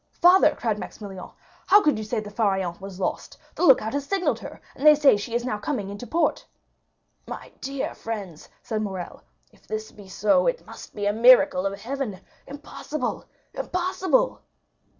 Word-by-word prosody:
"Father," 355 -3 +6
cried 215 -3 -2
Maximilian, 195 -4 -8 0.4
"how 405 +2 +8
could 300 -8 +2
you - - -4
say 220 +2 -2
the 210 -1 -8
Pharaon 195 -5 0
was 195 -1 -9
lost? 185 - -3 0.2
The - - -3
lookout 250 -8 +5
has 285 0 -1
signalled 340 - 0
her, - - -10 0.2
and 270 - -9
they 300 0 +8
say 290 -5 +5
she 225 +3 -4
is 240 0 -1
now 215 -5 -2
coming 210 -5 -3
into 205 +4 -8
port." 340 - 0 0.8
20063m - - -12
"My - - -8
dear 275 0 -3
friends," 200 -8 -7
said 215 -1 -2
Morrel, 190 -4 -6 0.3
"if - - -26
this 215 0 -5
be 205 -2 -14
so, 210 - +2
it - - -1
must - - -12
be 205 - -3
a 205 - +2
miracle 240 -3 +5
of 195 +1 -5
heaven! 240 -4 -4 0.3
Impossible, 290 +2 -5 0.3
impossible!" 375 +7 0
225 Hz, 175 wpm, -24 LUFS, 205-290 Hz, 0.8 s, how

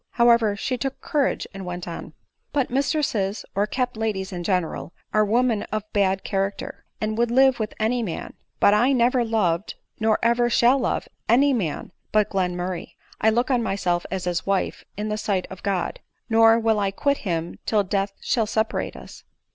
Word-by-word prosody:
However 235 -3 +4
she 250 +5 -2
took 270 +1 -3
courage 300 -5 0
and 195 0 -7
went 180 -1 -5
on. 170 - -7 0.2
" - - -48
But 275 -4 0
mistresses, 255 -7 0
or 200 +2 +1
kept 250 +1 -2
ladies 205 -4 -2
in 175 -1 -4
general, 180 -2 -1 0.2
are 215 - +4
women 230 0 +2
of 215 0 -1
bad 195 -2 +2
character, 195 0 -3
and 215 +1 -2
would 235 0 +2
live 265 +1 +4
with 215 -1 -3
any 235 +3 +1
man; 195 -8 -5 0.3
but 200 - +5
I 245 +6 +4
never 250 0 +3
loved, 210 -6 0 0.2
nor 220 -1 +3
ever 240 +1 +3
shall 240 +3 +4
love, 245 - -1 0.2
any 275 +5 +5
man 185 - -2 0.2
but 215 -1 +3
Mr - - -31
Glen 180 -2 0
murray. 180 0 -5 0.2
I 220 - +5
look 240 +4 +1
on 245 -2 +3
myself 185 -5 -1
as 190 -1 -3
his 180 0 -1
wife 195 -1 -1
in 210 +1 -2
the 210 0 -2
sight 195 -4 -1
of 190 - -9
God; 190 -3 -2 0.3
nor 225 0 +6
will 225 -2 +2
I 200 -1 +1
quit 280 +8 0
him 170 -4 -3
till 210 -2 +3
death 195 +1 -1
shall 225 -3 +1
seperate 220 +1 -1
us." - - -12
215 Hz, 190 wpm, -24 LUFS, 195-240 Hz, 0.3 s, nor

